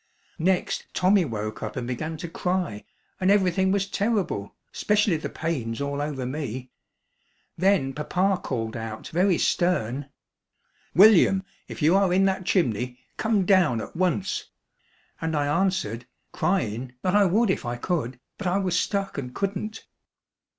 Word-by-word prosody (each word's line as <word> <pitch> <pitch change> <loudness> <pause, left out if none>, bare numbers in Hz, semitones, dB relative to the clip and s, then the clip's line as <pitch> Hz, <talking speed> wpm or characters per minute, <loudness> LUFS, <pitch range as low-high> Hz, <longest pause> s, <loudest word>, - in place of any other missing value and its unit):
Next 180 +2 0
Tommy 185 0 +4
woke 110 -4 -4
up - - -5
and 125 -2 -3
began 155 +6 -4
to 170 - -6
cry 180 - -2 0.3
and 185 0 +2
everything 190 -1 +3
was 195 0 +1
terrible, 200 - -1 0.2
specially 210 -3 +2
the 155 - -4
pains 130 -9 -3
all 140 0 -2
over 145 -3 -3
me. 130 -2 -5 0.8
Then 185 -8 +2
papa 180 +6 0
called 115 -4 -3
out 110 -1 -6
very 180 +1 +2
stern: 145 -6 0 0.9
"William, 195 -1 +6 0.2
if - - -6
you 160 +5 +5
are 195 -2 +3
in 190 +2 +4
that 190 -1 0
chimney 125 - +1 0.2
come 215 -4 +1
down 175 - +4
at - - -7
once!" 165 - 0 0.8
and 160 -1 -1
I 145 -1 +1
answered, 150 - 0 0.2
cryin', 125 - -1
that 185 +1 +1
I 205 -1 +6
would 205 +3 +3
if - - -2
I 120 -1 -3
could, 130 -3 -2 0.2
but 200 - -2
I 180 +2 +2
was 180 -2 +1
stuck 195 -6 -2
and 125 -2 -7
couldn't. 200 +2 -3
175 Hz, 150 wpm, -25 LUFS, 125-190 Hz, 0.9 s, William